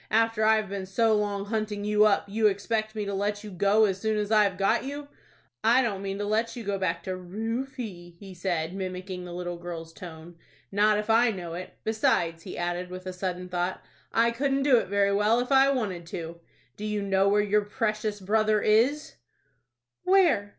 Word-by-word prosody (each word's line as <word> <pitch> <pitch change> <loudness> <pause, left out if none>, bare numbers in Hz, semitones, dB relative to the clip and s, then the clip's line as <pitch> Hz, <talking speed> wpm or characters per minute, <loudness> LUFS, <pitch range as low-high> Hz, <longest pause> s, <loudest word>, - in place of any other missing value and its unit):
"After 225 0 +2
I've 215 -1 +3
been 195 -1 -5
so 225 +3 +2
long 205 -1 -1
hunting 210 -1 -3
you 210 0 +4
up, 205 -2 +3
you 215 +2 +2
expect 215 +2 -1
me 210 -1 -2
to 200 - -3
let 205 +1 -2
you 210 - -8
go 200 +4 +3
as 190 -2 -2
soon 220 -1 0
as 210 0 -2
I've 205 -3 +3
got 200 +4 +2
you. 285 +2 -6 0.5
I 240 +4 +5
don't 200 -5 -2
mean 195 0 -4
to 205 - -3
let 220 +3 0
you 240 - -6
go 200 -1 -2
back 180 -3 -1
to 185 -1 -3
Rufie," 215 -1 -5
he 195 -2 -10
said, 175 -2 -2
mimicking 185 -1 -5
the 175 - -8
little 175 0 -5
girl's 165 -2 -7
tone,—"not 175 +5 -2
if 210 +1 -1
I 235 +2 +5
know 180 -6 -5
it. 180 +2 -7
Besides," 170 -6 +1
he 180 - -8
added, 175 +1 -2
with 185 0 -8
a 185 - -4
sudden 180 -1 -4
thought, 180 +1 -2 0.3
"I 235 +1 +3
couldn't 270 +3 0
do 275 -3 +5
it - - -4
very 200 +1 +2
well 210 +3 +3
if 250 +2 -3
I 270 0 +6
wanted 200 -11 -2
to. 170 0 -6 0.4
Do 210 - -8
you 210 -1 -2
know 195 0 +2
where 205 +1 +3
your 210 +1 +2
precious 215 -1 -2
brother 215 +2 +2
is?" 240 +9 +2 0.9
"Where?" 350 - +3
205 Hz, 200 wpm, -27 LUFS, 185-220 Hz, 0.9 s, I